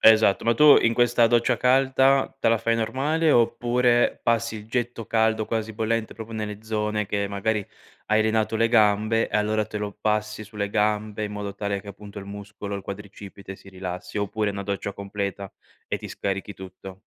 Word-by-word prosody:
Esatto, 110 -3 +5
ma 115 0 +3
tu 150 +3 +8
in 115 - +3
questa 120 -1 +4
doccia 120 +1 +2
calda, 135 +2 +3
te - - +2
la 115 -1 +3
fai 115 +1 +1
normale, 145 +8 +1
oppure 120 +1 +2
passi 115 -1 +1
il 105 - -10
getto 120 -1 -3
caldo, 110 -1 +1
quasi 110 -1 -2
bollente 110 0 -1
proprio, 110 0 -8
nelle 105 -1 -5
zone, 105 -1 -1
che 100 0 -1
magari 100 +1 -1 0.4
hai 110 0 +3
allenato 110 0 +1
le 115 +1 +3
gambe 110 0 +3
e - - +1
allora 105 0 +1
te 105 - -6
lo 105 0 -5
passi 105 0 -1
sulle 100 -1 -4
gambe, 105 0 0
in 105 - -5
modo 100 -1 -5
tale 100 -1 -2
che 100 - -13
appunto 100 0 -10
il 100 - -9
muscolo, 100 0 -7
il 100 - -5
quadricipite 100 0 -9
rilassi, 95 +1 -6
oppure 105 +1 -1
una 100 0 -5
doccia 100 0 -3
completa 100 -1 -5 0.4
e - - -1
ti - - -8
scarichi 100 +1 -3
tutto? 95 0 -11
105 Hz, 180 wpm, -24 LUFS, 100-115 Hz, 0.4 s, tu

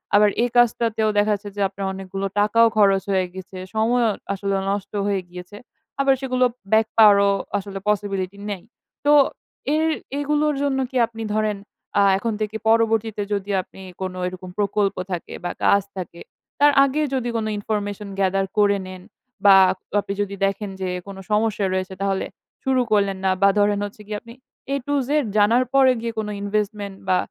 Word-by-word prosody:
আবার 210 0 +6
এই 245 - +1
কাজটাতেও 230 -2 +2
দেখা 205 +1 +3
যাচ্ছে 205 0 -8
যে 205 - -3
আপনার 195 0 -6
অনেকগুলো 195 +1 -5
টাকাও 230 +3 +5
খরচ 195 -2 +4
হয়ে 190 -1 +2
গিয়েছে। 190 0 -10 0.2
সময়ও 230 +1 +2 0.2
আসলে 195 0 -2 0.2
নষ্ট 200 0 -4 0.2
হয়ে 200 -2 0
গিয়েছে। 180 +3 -10 0.4
আবার 275 0 +4
সেগুলো 255 -1 +1 0.3
ব্যাক 220 0 +4
পাওয়ারও 200 -2 +7 0.3
আসলে 200 0 -6
possibility 200 -2 -1
নেই। 190 -3 -6 0.4
তো 290 - +5 0.6
এর 315 +1 +2 0.3
এগুলোর 300 +1 +1
জন্য 275 -2 0
কি 260 - -3
আপনি 225 0 -8
ধরেন 215 -1 0 0.4
আ - - +5
এখন 225 +3 -2
থেকে 215 0 -2
পরবর্তীতে 225 -1 +2
যদি 200 0 -2
আপনি 190 - -15 0.2
কোনো 185 -1 -4
এরকম 185 0 -8
প্রকল্প 205 -1 +1 0.2
থাকে 175 -2 -5
বা 175 - -2
কাজ 200 - +5 0.2
থাকে 175 -2 -7 0.4
তার 290 +1 +6
আগে 275 +2 0
যদি 250 -2 -1
কোনো 220 -1 -2
information 205 -1 -3
gather 195 0 +1
করে 205 -1 +4
নেন 185 -1 -9 0.4
বা 200 -1 +9 0.2
আপ 190 - -6 0.2
আপনি 200 - -4
যদি 200 -1 -3
দেখেন 195 +1 -2
যে, 185 - -1 0.2
কোনো 195 -1 -8
সমস্যা 210 -1 +1
রয়েছে 185 0 -2
তাহলে 195 -1 0 0.4
শুরু 265 -2 +2
করলেন 200 -2 +2
না 190 - +4
বা 200 - +6
ধরেন 205 0 +2
হচ্ছে 205 +1 -10
গিয়ে 210 -1 -4
আপনি 230 0 -13 0.4
A - - +2
to 285 - 0
Z - - -9 0.3
জানার 225 +5 +4
পরে 270 -1 +6
গিয়ে 230 0 -3
কোনো 210 -1 -3
investment 205 -1 -2
বা 185 - +4
205 Hz, 175 wpm, -22 LUFS, 195-225 Hz, 0.6 s, বা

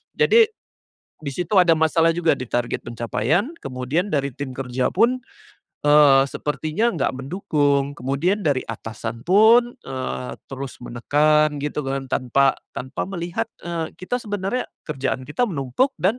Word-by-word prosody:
Jadi 455 0 +5 0.8
di 140 - -3
situ 180 +6 -2
ada 170 -2 +6
masalah 165 +1 +3
juga 170 -2 +3
di 130 - -4
target 120 +1 -2
pencapaian, 120 - 0
kemudian 135 +9 -2
dari 140 -1 +1
tim 140 -2 -5
kerja 125 -1 -1
pun, 250 +3 +3 0.7
eee, 145 -2 +7
sepertinya 155 - -1
nggak 145 -5 0
mendukung, 140 -2 0
kemudian 160 +11 0
dari 140 -4 +1
atasan 115 +1 -6
pun, 225 +6 +6
eee, 130 -1 -4 0.2
terus 135 -1 -6
menekan 150 +5 +2
gitu 150 0 -2
kan. 135 0 -2
Tanpa 135 +2 +2 0.2
tanpa 130 +2 -4
melihat, 170 -9 -3 0.2
eee, 170 -2 -3
kita 245 +7 -2
sebenarnya 205 +3 -2 0.2
kerjaan 135 -3 -2
kita 150 - 0
menumpuk 145 - 0
dan 210 +7 +2
150 Hz, 135 wpm, -22 LUFS, 130-180 Hz, 0.8 s, eee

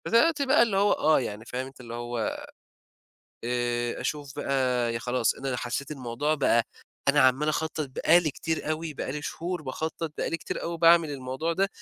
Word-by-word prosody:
فَزَي 230 - +5
دلوقتي 315 0 +3
بقى 270 +1 +5
اللي 215 -5 0
هو 205 +1 +4
آه، 155 0 +4
يعني 110 -3 -5
فاهم 125 +2 -4
أنت 135 0 -12
اللي 115 -1 -8
هو 120 -1 -3 1.1
آآ 120 0 -1
أشوف 145 -2 -3
بقى 125 -3 0
ي - - -1
خلاص، 125 -1 +1
أنا 135 -2 -3
حسّيت 125 +4 -3
الموضوع 140 +2 -1
بقى 125 -5 +3 0.5
أنا 145 +1 +5
عمّال 130 +3 +4
أخطّط 155 -1 -1
بقى 170 +6 +4
لي 160 -3 -1
كتير 160 +2 -3
أوي، 155 0 -3
بقى 130 - -4
لي 150 +1 -5
شهور 175 +2 -4
باخطّط، 160 +3 -4
بقى - - -1
لي 165 - 0
كتير - - -5
أوي 170 0 -3
باعمل 165 -1 +6
الموضوع 135 +4 -3
ده 195 +4 +1
140 Hz, 195 wpm, -27 LUFS, 125-165 Hz, 1.1 s, باعمل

